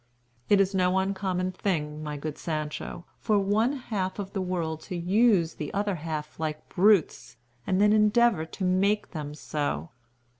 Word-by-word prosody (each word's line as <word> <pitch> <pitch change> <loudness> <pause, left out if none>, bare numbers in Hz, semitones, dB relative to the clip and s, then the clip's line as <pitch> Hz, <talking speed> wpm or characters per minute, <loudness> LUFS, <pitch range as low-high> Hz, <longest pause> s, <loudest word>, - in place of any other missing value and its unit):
"It 205 - +5
is 195 0 +2
no 185 0 +2
uncommon 190 -1 -1
thing, 155 -5 -2
my 150 -1 -4
good 150 +1 -5
Sancho, 155 +2 -4
for 215 - +2
one 210 +6 +2
half 205 -8 -3
of 200 -1 -6
the 195 - -1
world 170 -4 -2
to 185 - -3
use 185 -1 +3
the 150 - -5
other 205 0 0
half 155 -2 -5
like 155 -1 -4
brutes, 175 - +2 0.3
and 185 0 +2
then 210 +1 +5
endeavor 215 -4 +4
to 190 - -6
make 200 +3 +1
them 150 -2 -5
so. 145 - -3
185 Hz, 160 wpm, -27 LUFS, 155-205 Hz, 0.3 s, It